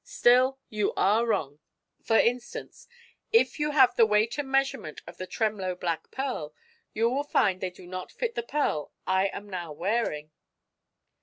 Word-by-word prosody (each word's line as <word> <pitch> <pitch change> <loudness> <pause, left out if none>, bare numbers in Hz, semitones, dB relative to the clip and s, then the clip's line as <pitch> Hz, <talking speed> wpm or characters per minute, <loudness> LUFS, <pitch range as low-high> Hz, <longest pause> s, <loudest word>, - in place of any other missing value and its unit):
Still, 255 +2 +3
you 210 -2 -1
are 220 +5 +3
wrong. 150 -10 -1 0.4
For 225 - +3
instance, 245 +1 -1 0.4
if 455 -7 +3
you 300 0 +1
have 260 -4 +5
the 230 - +6
weight 215 +5 +2
and 280 -2 -3
measurement 270 - -1
of 170 +1 -11
the 185 - -6
Tremloe 205 -5 -1
black 170 -2 -3
pearl, 250 - -4 0.4
you 225 +2 +1
will 265 +4 0
find 195 -10 +1
they 185 - -1
do 180 - -15
not 185 +1 -7
fit 475 -2 -3
the - - -2
pearl 235 - -1
I 190 +1 +2
am 205 +1 -7
now 175 -5 -5
wearing." 160 -3 -2
215 Hz, 165 wpm, -27 LUFS, 180-255 Hz, 0.4 s, the